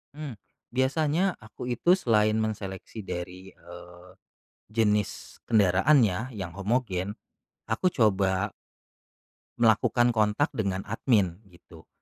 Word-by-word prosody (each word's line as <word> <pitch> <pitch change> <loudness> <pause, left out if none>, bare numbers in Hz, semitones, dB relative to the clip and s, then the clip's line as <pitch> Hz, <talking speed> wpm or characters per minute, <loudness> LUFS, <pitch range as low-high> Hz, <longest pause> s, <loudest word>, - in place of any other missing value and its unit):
Mmm, 150 -2 -6 0.4
biasanya 150 +8 +1
aku 110 +2 -9
itu 125 +8 +2
selain 110 -2 +3
mengseleksi 105 -1 -4
dari, 90 +1 -7
eee, 90 +1 -14 0.6
jenis 105 -2 -1
kendaraan 110 +6 +4
ya, 110 +5 -2
yang 95 -8 -6
homogen. 100 -2 -2 0.5
Aku 180 +11 +1
coba 100 -3 +2 1.1
melakukan 120 +1 +3
kontak 110 +6 +1
dengan 95 -3 -2
admin 105 -5 0
gitu, 85 -3 -17
105 Hz, 100 wpm, -27 LUFS, 95-120 Hz, 1.1 s, kendaraan